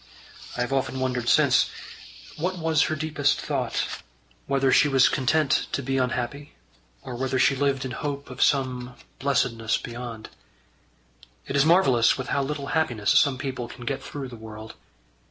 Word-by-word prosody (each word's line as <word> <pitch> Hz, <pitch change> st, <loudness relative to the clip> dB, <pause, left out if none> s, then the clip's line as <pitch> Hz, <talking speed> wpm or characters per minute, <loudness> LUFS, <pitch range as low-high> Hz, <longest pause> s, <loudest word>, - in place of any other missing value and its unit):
I -, -, -1 dB
have 125 Hz, +2 st, -1 dB
often 130 Hz, -1 st, -1 dB
wondered 125 Hz, -2 st, -1 dB
since, -, -, +4 dB, 0.7 s
what 180 Hz, +4 st, -2 dB
was 160 Hz, -2 st, +2 dB
her 155 Hz, -, 0 dB
deepest 150 Hz, -1 st, 0 dB
thought -, -, -2 dB, 0.5 s
whether 135 Hz, -1 st, +2 dB
she 150 Hz, -, +5 dB
was 135 Hz, -2 st, +5 dB
content 140 Hz, +2 st, +1 dB
to 140 Hz, -, -1 dB
be 135 Hz, +1 st, 0 dB
unhappy, 130 Hz, +3 st, -3 dB, 0.5 s
or 130 Hz, -, -7 dB
whether 130 Hz, +1 st, -1 dB
she 135 Hz, -, +4 dB
lived 135 Hz, -1 st, 0 dB
in 130 Hz, -, -4 dB
hope 140 Hz, 0 st, -5 dB
of 130 Hz, -, -7 dB
some 125 Hz, -3 st, +1 dB, 0.2 s
blessedness 115 Hz, -5 st, +1 dB
beyond. 120 Hz, -2 st, -7 dB, 1.2 s
It 135 Hz, -, -4 dB
is 140 Hz, +1 st, +4 dB
marvellous 135 Hz, -9 st, +4 dB
with 130 Hz, -, -5 dB
how 140 Hz, -, +1 dB
little 140 Hz, 0 st, -4 dB
happiness 120 Hz, -10 st, +1 dB
some 140 Hz, -2 st, +4 dB
people 130 Hz, -3 st, -4 dB
can 120 Hz, 0 st, -10 dB
get 135 Hz, 0 st, -2 dB
through 140 Hz, -3 st, -7 dB
the 120 Hz, -, -9 dB
world. 110 Hz, 0 st, -10 dB
135 Hz, 160 wpm, -25 LUFS, 125-140 Hz, 1.2 s, she